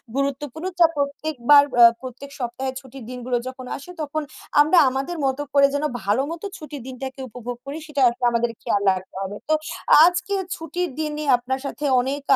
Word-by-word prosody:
গুরুত্বপূর্ণ। 280 +3 -2
যা 335 - +8
প্রত্যেকবার 285 -1 +4 0.2
আ - - +11 0.2
প্রত্যেক 260 +2 -8
সপ্তাহে 260 +2 -3
ছুটির 265 -1 -12
দিনগুলো 250 0 -2
যখন 255 0 -7
আসে 280 +6 -11
তখন 310 +1 -2 0.4
আমরা 310 +4 +4
আমাদের 275 +7 -3
মতো 265 +1 0
করে 280 -1 +6
যেন 285 - -1 0.2
ভালোমতো 275 - -1
ছুটির 300 -3 -8
দিনটাকে 265 +1 -7
উপভোগ 245 +1 -6
করি 280 +3 -5
সেটা 290 -2 -2
আসলে 245 +1 -3
আমাদের 235 0 +1
খেয়াল 200 - 0
রাখতে 185 0 -8
হবে। 195 +2 -5
তো - - +4 0.5
আজকে 360 +3 +1 0.2
ছুটির 345 +2 -3
দিন 305 -1 -1
নিয়ে 300 -1 -3
আপনার 260 +2 -3
সাথে 290 +1 -4 0.2
অনেক 275 +3 -3
275 Hz, 170 wpm, -23 LUFS, 250-300 Hz, 0.5 s, আ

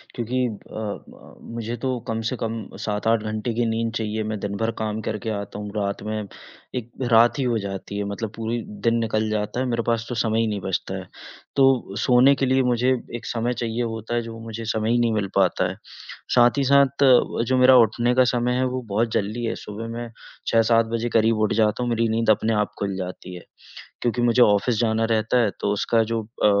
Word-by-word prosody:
क्योंकि 120 +2 -2
अ 110 -3 -10
अ, 105 -2 -8 0.2
मुझे 115 0 -3
तो 130 -2 -1
कम 115 0 -2
से - - -3
कम 115 0 -2 0.3
7-8 110 +1 0
घंटे 110 +2 -3
की 120 +1 0
नींद 115 0 -1
चाहिए, 110 -1 -2
मैं 110 -1 -3
दिन 100 0 -4
भर 115 +1 0
काम 110 0 -2
करके 110 0 -4
आता 100 0 -7
हूँ, 105 0 -6
रात 100 -1 -2
में 110 -1 -3 0.5
एक 120 -1 -5 0.2
रात 115 +4 +5
ही 135 - +1
हो 120 -2 +1
जाती 100 0 -6
है, 100 - -1
मतलब 100 +2 -4
पूरी 115 +1 -2 0.3
दिन 115 - +3
निकल 110 -1 0
जाता 105 +2 -2
है, 130 - 0
मेरे 120 -2 -1
पास 115 -1 0
तो 125 - -3
समय 110 -1 +1
ही 115 - +2
नहीं 105 -2 -2
बचता 95 -1 -3
है। - - -7 0.5
तो 135 -7 +3
सोने 125 +4 +5
के 135 - 0
लिए 130 +1 +3
मुझे 125 0 +2 0.3
एक 120 - -7
समय 120 +1 -1
चाहिए 120 0 -2
होता 110 0 -4
है, 120 - +1
जो 115 0 -8
मुझे 115 0 -7
समय 110 0 -1
ही 120 - +3
नहीं 120 -1 +2
मिल 105 -2 0
पाता 95 -1 +2
है। 90 - -6 0.6
साथ 120 +2 +5
ही 140 - +2
साथ 140 0 +4 0.4
जो 130 +2 +1
मेरा 130 +1 +7
उठने 120 +1 +3
का 130 - +6
समय 120 0 +1
है, 130 +1 +1
वो 130 0 -2
बहुत 110 +3 0
जल्दी 110 +4 -1
है। 115 - -2
सुबह 105 +2 -7
मैं 120 0 -5 0.4
6-7 115 0 +4
बजे 115 +1 -1
करीब 115 -1 +3
उठ 110 - +2
जाता 110 +2 +1
हूँ, 120 - -1
मेरी 115 0 +1
नींद 115 0 0
अपने 110 +1 +3
आप 105 -1 0
खुल 100 -1 -2
जाती 90 -1 -6
है। 90 - -10 0.6
क्योंकि 120 0 0
मुझे 120 +1 +4
ऑफ़िस 105 +1 +3
जाना 110 -1 +1
रहता 115 +2 +2
है, 110 -3 +2
तो 100 - 0
उसका 115 +3 +2
जो 115 +1 -2
अ, 110 +1 -2
115 Hz, 220 wpm, -23 LUFS, 105-120 Hz, 0.6 s, मेरा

